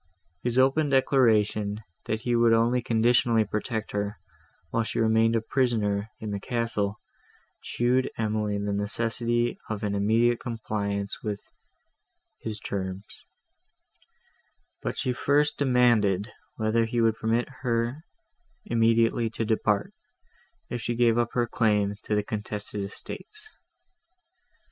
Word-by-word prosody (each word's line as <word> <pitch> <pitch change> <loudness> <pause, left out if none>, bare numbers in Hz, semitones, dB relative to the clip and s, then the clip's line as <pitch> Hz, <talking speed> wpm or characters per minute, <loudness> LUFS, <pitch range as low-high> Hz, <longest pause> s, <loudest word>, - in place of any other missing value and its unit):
His 120 0 -1
open 135 +3 +3
declaration, 110 -6 +2 0.2
that 110 0 -2
he 120 0 0
would 115 -1 +4
only 120 +2 +3
conditionally 115 -1 +3
protect 110 +2 -3
her, 105 0 -2 0.5
while 115 - +1
she 110 - -3
remained 110 0 +3
a 115 - +2
prisoner 110 -4 0
in 110 -1 -5
the 100 - -2
castle, 115 -3 -2 0.6
showed 125 +2 +1
Emily 105 -2 -1
the 100 0 -2
necessity 115 +3 0
of 110 -1 -4
an 105 -1 -1
immediate 115 +4 +2
compliance 100 -4 -3
with 105 -2 -3 1.0
his 110 -1 -3
terms; 95 -1 -6 1.5
but - - -3
she 125 - 0
first 145 +4 +1
demanded, 120 -6 +3 0.2
whether 110 +1 +1
he 120 +1 -2
would 115 -1 +3
permit 115 +2 0
her 120 +3 -1 0.6
immediately 115 0 +2
to 115 0 -3
depart, 105 -2 0 0.7
if 120 - -4
she 120 +2 -2
gave 120 -1 +3
up 120 0 0
her 120 -1 +2
claim 105 -4 +1
to 105 - 0
the 105 - +1
contested 105 -1 -4
estates. 425 - -6
115 Hz, 125 wpm, -27 LUFS, 105-120 Hz, 1.5 s, would